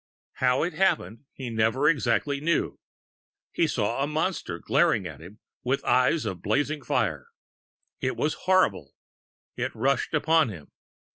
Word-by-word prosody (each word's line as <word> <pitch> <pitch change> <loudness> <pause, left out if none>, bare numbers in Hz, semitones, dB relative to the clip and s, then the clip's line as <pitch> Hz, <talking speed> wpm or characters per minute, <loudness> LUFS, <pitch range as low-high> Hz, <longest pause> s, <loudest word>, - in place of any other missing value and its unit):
How 125 +1 +2
it 175 - -2
happened, 155 - 0
he 130 -3 -7
never 115 +6 +2
exactly 140 -1 +1
knew. 165 +2 0 0.7
He 165 - +1
saw 120 -1 -1
a 140 - +1
Monster 155 - -2
glaring 140 - +2
at 80 -5 -7
him 90 +6 -12 0.3
with 130 +2 -1
eyes 130 +3 +3
of 95 -5 -4
blazing 145 +5 0
fire. - - -1 0.7
It 130 - -1
was 150 - 0 0.2
horrible! 185 - +2 0.6
It - - -3
rushed 135 +6 0
upon 160 -2 +3
him. 85 -8 -10
135 Hz, 140 wpm, -26 LUFS, 110-155 Hz, 0.7 s, eyes